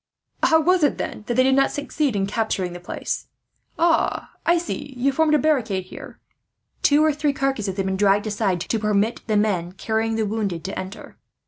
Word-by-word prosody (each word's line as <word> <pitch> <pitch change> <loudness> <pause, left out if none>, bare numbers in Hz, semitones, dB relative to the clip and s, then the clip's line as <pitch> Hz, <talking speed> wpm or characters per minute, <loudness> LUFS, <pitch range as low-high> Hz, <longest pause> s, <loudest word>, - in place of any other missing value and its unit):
"How 320 - +5
was 360 +3 +3
it, 290 - +2
then, 210 - -5
they 240 - -1
did 260 +1 +4
not 275 +1 +4
succeed 290 -3 -2
in 195 -1 +1
capturing 200 -4 -1
the 175 - -7
place? 175 - -4 0.5
Ah, 335 -1 +1 0.2
I 345 +1 +5
see, 285 -5 -5
you 270 +3 +2
formed 305 +2 +3
a - - +5
barricade 245 -10 +1
here." 185 - -11 0.6
Two 295 +1 +4
or 310 - +3
three 300 0 0
of 280 - -1
the - - -11
carcasses 215 -8 -1
had 195 - 0
been 190 0 -1
dragged 205 +1 +3
aside, 195 -4 -1
to 225 - -1
permit 210 +1 0
the 215 -2 +2
men 185 -5 0
carrying 220 +3 -1
the 220 -1 0
wounded 200 -6 -2
to 195 - -4
enter. 185 +3 -9
220 Hz, 205 wpm, -23 LUFS, 195-285 Hz, 0.6 s, How